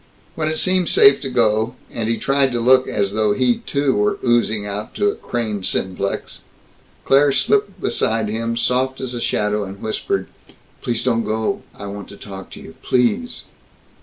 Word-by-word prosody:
When 155 Hz, -1 st, -2 dB
it 155 Hz, 0 st, -1 dB
seemed 185 Hz, 0 st, +2 dB
safe 420 Hz, 0 st, +6 dB
to 135 Hz, -, -3 dB
go, 115 Hz, -1 st, +1 dB, 0.2 s
and 115 Hz, -1 st, -2 dB
he 115 Hz, -, +1 dB
tried 135 Hz, -1 st, +2 dB
to 120 Hz, -, 0 dB
look 130 Hz, +2 st, +4 dB
as 100 Hz, -1 st, -1 dB
though 105 Hz, -1 st, +2 dB
he 125 Hz, +1 st, +2 dB
too 140 Hz, -2 st, 0 dB
were 105 Hz, 0 st, +1 dB
oozing 115 Hz, -3 st, +2 dB
out 105 Hz, +1 st, -5 dB
to 205 Hz, 0 st, +2 dB
a -, -, -8 dB
Crane 110 Hz, -4 st, -3 dB
Simplex, 95 Hz, +1 st, -3 dB, 0.6 s
Claire 140 Hz, +1 st, +5 dB
slipped 200 Hz, +9 st, +1 dB
beside 110 Hz, -1 st, 0 dB
him, 115 Hz, +2 st, -2 dB
soft 130 Hz, +2 st, 0 dB
as 130 Hz, -2 st, -4 dB
a 120 Hz, -, -4 dB
shadow, 105 Hz, -1 st, 0 dB
and 100 Hz, 0 st, -8 dB
whispered, 110 Hz, +1 st, -2 dB, 0.6 s
"Please 120 Hz, -2 st, -1 dB
don't 115 Hz, -3 st, +1 dB
go. 110 Hz, +1 st, -1 dB, 0.2 s
I 100 Hz, -, -7 dB
want 100 Hz, 0 st, -7 dB
to 100 Hz, -, -11 dB
talk 95 Hz, -2 st, -9 dB
to -, -, -9 dB
you. -, -, -11 dB
_Please! 210 Hz, -, +1 dB
115 Hz, 180 wpm, -20 LUFS, 105-130 Hz, 0.6 s, safe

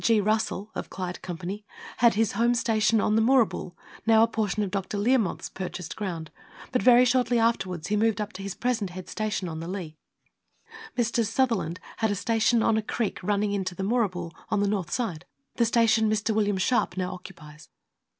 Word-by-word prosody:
G. 225 Hz, -2 st, +4 dB
Russell 215 Hz, 0 st, -1 dB, 0.2 s
(Clyde 180 Hz, -1 st, -5 dB
Company) 185 Hz, +4 st, -5 dB, 0.3 s
had 235 Hz, -3 st, +4 dB
his 220 Hz, 0 st, +2 dB
home 235 Hz, +3 st, +2 dB
station 225 Hz, -2 st, +2 dB
on 210 Hz, -, +2 dB
the 220 Hz, -, +4 dB
Moorabool, 230 Hz, -7 st, +2 dB, 0.3 s
now 225 Hz, 0 st, +6 dB
a -, -, +4 dB
portion 215 Hz, -2 st, -1 dB
of 195 Hz, -, -3 dB
Dr. 195 Hz, +1 st, -3 dB
Learmonth^ 225 Hz, -1 st, +1 dB
purchased 180 Hz, -2 st, -5 dB
ground, 170 Hz, -7 st, -5 dB, 0.4 s
but 250 Hz, -, +1 dB
very 250 Hz, 0 st, +7 dB
shortly 245 Hz, -1 st, +2 dB
afterwards 185 Hz, -7 st, 0 dB
he 210 Hz, -, +2 dB
moved 220 Hz, 0 st, +2 dB
up 210 Hz, +1 st, -4 dB
to 195 Hz, -, -8 dB
his 195 Hz, -1 st, -5 dB
present 235 Hz, -6 st, -1 dB
head 180 Hz, 0 st, -8 dB
station, 215 Hz, -3 st, -2 dB
on 160 Hz, -1 st, -5 dB
the 165 Hz, -, -6 dB
Leigh. 175 Hz, -5 st, -6 dB, 1.0 s
Messrs. 230 Hz, -2 st, +1 dB
Sutherland 225 Hz, -9 st, 0 dB, 0.2 s
had 220 Hz, -1 st, +1 dB
a 205 Hz, -, 0 dB
station 225 Hz, +2 st, +2 dB
on 220 Hz, -, +3 dB
a -, -, +1 dB
creek 215 Hz, -1 st, -3 dB
running 205 Hz, +2 st, 0 dB
into 190 Hz, -3 st, -2 dB
the 190 Hz, -, -4 dB
Moorabool, 190 Hz, -6 st, 0 dB, 0.2 s
on 215 Hz, -, +1 dB
the 205 Hz, -, +2 dB
north 195 Hz, -5 st, -1 dB
side 180 Hz, -6 st, -2 dB, 0.3 s
the 235 Hz, -, +4 dB
station 225 Hz, -1 st, +3 dB
Mr. 215 Hz, +1 st, 0 dB
William 205 Hz, -2 st, +1 dB
Sharpe 190 Hz, -2 st, +1 dB
now 185 Hz, -1 st, -2 dB
occupies. 155 Hz, -5 st, -12 dB
210 Hz, 190 wpm, -26 LUFS, 185-225 Hz, 1.0 s, very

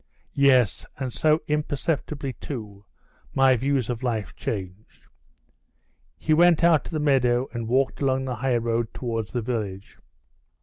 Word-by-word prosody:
Yes, 130 Hz, -6 st, +3 dB
and 130 Hz, -3 st, -4 dB
so 155 Hz, 0 st, +2 dB
imperceptibly 150 Hz, -1 st, -2 dB
too 105 Hz, -6 st, -8 dB, 0.5 s
my 135 Hz, -1 st, +5 dB
views 130 Hz, 0 st, 0 dB
of 120 Hz, -1 st, -3 dB
life 115 Hz, -5 st, -2 dB
changed!" 95 Hz, 0 st, -6 dB, 1.1 s
He 155 Hz, -, +1 dB
went 170 Hz, 0 st, +5 dB
out 165 Hz, -4 st, +4 dB
of -, -, -8 dB
the 155 Hz, -, -2 dB
meadow 130 Hz, -3 st, +2 dB
and 115 Hz, -2 st, -4 dB
walked 130 Hz, +4 st, +1 dB
along 135 Hz, -1 st, +1 dB
the 125 Hz, -3 st, -3 dB
highroad 115 Hz, -2 st, -1 dB
towards 115 Hz, -4 st, -3 dB
the 120 Hz, -2 st, -2 dB
village. 105 Hz, -5 st, -4 dB
130 Hz, 135 wpm, -25 LUFS, 115-140 Hz, 1.1 s, my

